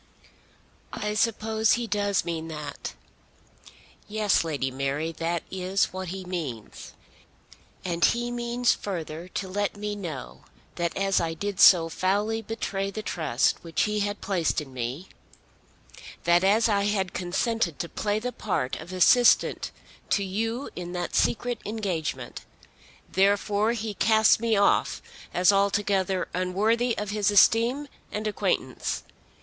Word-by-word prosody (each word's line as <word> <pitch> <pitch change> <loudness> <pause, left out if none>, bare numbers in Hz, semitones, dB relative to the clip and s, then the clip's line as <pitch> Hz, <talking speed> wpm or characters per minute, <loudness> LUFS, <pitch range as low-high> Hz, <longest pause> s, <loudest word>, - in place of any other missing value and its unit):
"I 210 0 -2
suppose 220 0 +2
he 240 0 0
does 205 -2 0
mean 165 -1 -3
that." 150 -3 -6 1.1
"Yes, 210 -3 +2
Lady 140 -5 -2
Mary; 140 +4 -2
that 165 +1 -2
is 190 +1 0
what 185 0 -5
he 190 +2 -6
means. 150 - -6 0.9
And 175 -1 -1
he 240 +1 +2
means 240 0 +1
further 170 -3 -5
to 190 +1 -4
let 205 +2 -2
me 210 0 -3
know 165 -10 -7 0.3
that 170 -1 -2
as 195 0 +2
I 165 -1 -2
did 200 +2 -4
so 170 -3 +8
foully 205 +6 0
betray 200 -3 -3
the 215 +2 -6
trust 155 - 0
which 165 -2 0
he 210 0 0
had 205 0 -2
placed 185 -5 0
in 140 -4 -9
me, 130 +8 -4 1.2
that 175 +1 +4
as 215 +4 +4
I 200 -2 +2
had 195 -3 0
consented 185 - -1
to 170 - -3
play 205 +4 -1
the 245 +3 -3
part 130 -10 -2
of 165 +3 -9
assistant 230 +7 +4 0.4
to 200 - +2
you 225 +7 -3
in 175 0 -6
that 175 -1 -3
secret 240 0 +1
engagement, 195 -8 -4 0.7
therefore 205 +3 +2
he 220 -2 -3
casts 220 +2 +4
me 230 -2 +1
off 200 - +2 0.3
as 180 +2 +4
altogether 195 -1 +1
unworthy 215 +7 +1
of 210 0 -3
his 210 -2 +1
esteem 230 +7 +4 0.2
and 210 +1 -4
acquaintance. 215 - -1
195 Hz, 135 wpm, -26 LUFS, 175-215 Hz, 1.2 s, so